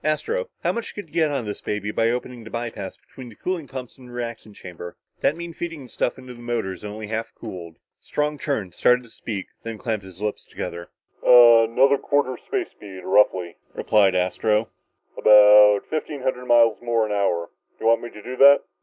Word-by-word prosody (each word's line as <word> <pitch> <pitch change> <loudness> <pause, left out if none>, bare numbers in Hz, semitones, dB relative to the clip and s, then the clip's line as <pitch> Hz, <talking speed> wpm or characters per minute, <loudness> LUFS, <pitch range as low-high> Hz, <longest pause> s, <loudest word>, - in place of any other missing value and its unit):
"Astro, 460 - -1
how - - +2
much 235 -1 -6
could 205 -6 -8
you - - -26
get 160 -2 +2
out 140 -3 -1
of - - -9
this 105 -1 -6
baby 105 0 -3
by 115 +1 +1
opening 125 0 -4
the 110 - -10
by 115 0 -4
pass 95 -3 -8
between 130 -2 -13
the 110 - -15
cooling 175 - -4
pumps 130 -1 -8
and 125 - -13
the - - -12
reactant 115 -3 -7
chamber? 90 -1 -10 0.2
That'd 150 - +1
mean 170 0 -7
feeding 165 -4 -6
the 125 - -14
stuff 120 - -2
into 130 -1 -10
the 120 - -13
motors 115 -6 -3
only 105 +1 -6
half 115 +1 -4
cooled." 90 -7 -9 0.2
Strong 150 0 -2
turned, 110 - -3
started 125 +6 +3
to 115 - -17
speak, 100 -4 -6
then 115 -1 -6
clamped 110 -3 -3
his 95 -1 -13
lips 105 0 -3
together. 85 0 -7 0.3
"Another 120 +3 +6
quarter 140 -3 0
space 395 -5 -3
speed, 95 -3 -11
roughly," 95 -3 +2 0.2
replied 100 -3 +3
Astro, 105 +5 +1 0.5
"about 105 -1 +7
fifteen 150 -3 -4
hundred 125 -1 -2
miles 115 -2 +4
more 115 -2 +1
an 105 - -5
hour. 95 -4 0 0.3
Do - - -8
you - - +4
want 115 - +3
me 120 - -7
to 105 - -13
do 125 - -6
that?" 140 +1 +7
115 Hz, 205 wpm, -23 LUFS, 105-130 Hz, 0.5 s, about